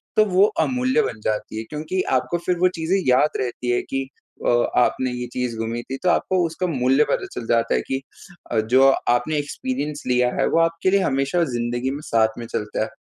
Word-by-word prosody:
तो 215 - +5
वो 195 0 +4 0.2
अमूल्य 255 -2 +1
बन 110 - -4
जाती 110 0 -2
है। 110 - -3
क्योंकि 155 +5 -2 0.2
आपको 175 +6 -2
फ़िर 180 - +1
वो 185 - +5
चीज़ें 165 +4 +1
याद 130 +4 +3
रहती 125 -1 -3
हैं 120 - +1
कि 135 0 -2 0.4
अ, - - +3 0.3
आपने 130 +1 +2
ये 125 0 -4
चीज़ 125 -2 -2
गुमी 115 +1 -3
थी 135 - -2
तो 180 - +3
आपको 185 +1 +1
उसका 165 +3 -2
मूल्य 135 -2 +3
पता - - 0
चल 120 - -5
जाता 115 0 +2
है - - +1
कि 135 0 -2 0.5
अ, 115 - +2
जो 125 +5 +4 0.2
आपने 120 +6 +1
एक्सपीरियंस 145 0 -3
लिया 125 0 +3
है, - - +3
वो 165 - +2
आपके 165 +2 +1
लिए 200 - +4
हमेशा 140 +3 +1
ज़िंदगी 120 +2 -1
में 140 +2 -5
साथ 110 -1 +2
में 120 - -6
चलता 105 -1 -3
है - - -4
135 Hz, 210 wpm, -22 LUFS, 120-165 Hz, 0.5 s, तो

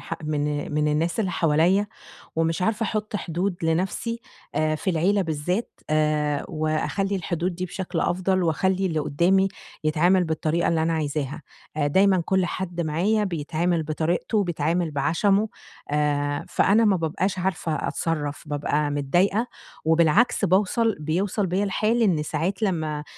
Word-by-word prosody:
ح 165 - -5
من 150 -1 -2
من 150 0 +2
الناس 165 +7 0
اللي 190 -4 0
حواليَّ، 170 +5 +2 0.5
ومش 165 +1 0
عارفة 220 +3 +1
أحُط 215 -1 -2
حدود 180 +1 -2
لنَفْسي 190 +8 -1 0.3
آآ 155 0 +1
في 190 +5 -1
العيلة 190 +4 +2
بالذات، 170 +7 -3
آآ 150 -1 +1
وأخلّي 155 +6 -1
الحدود 175 0 -2
دي 180 - -3
بشكل 180 -1 -4
أفضل، 185 +1 +1
وأخَلّي 190 +3 +1
اللي 160 -3 -1
قُدّامي 180 +6 +2 0.4
يتعامل 175 +4 +3
بالطريقة 160 +1 0
اللي 165 -1 +1
أنا 165 +1 +1
عايزاها. 150 -1 -2 0.3
آآ 145 -2 +1
دايمًا 190 +4 +4
كل 190 -1 +2
حد 175 -1 -4
معايا 180 +7 +1
بيتعامل 170 -1 -1
بطريقته، 160 +7 -1
وبيتعامل 170 -2 0
بعَشَمُه، 180 +9 +1 0.4
آآ 145 -1 0
فأنا 215 +4 +3
ما 205 -3 +4
بابقاش 185 +3 -1
عارفة 180 -3 -1
أتْصرّف، 150 -3 -2
بابقى 145 0 0
متضايقة، 175 - +1 0.4
وبالعكس 165 +9 +3
باوْصل 200 +4 +2
بيوْصل 185 +6 0
بيَّ 185 +3 0
الحال 215 +4 +1
إن 175 -8 +2
ساعات 165 +7 -2
لمّا 155 -7 -1
170 Hz, 140 wpm, -24 LUFS, 155-190 Hz, 0.5 s, دايمًا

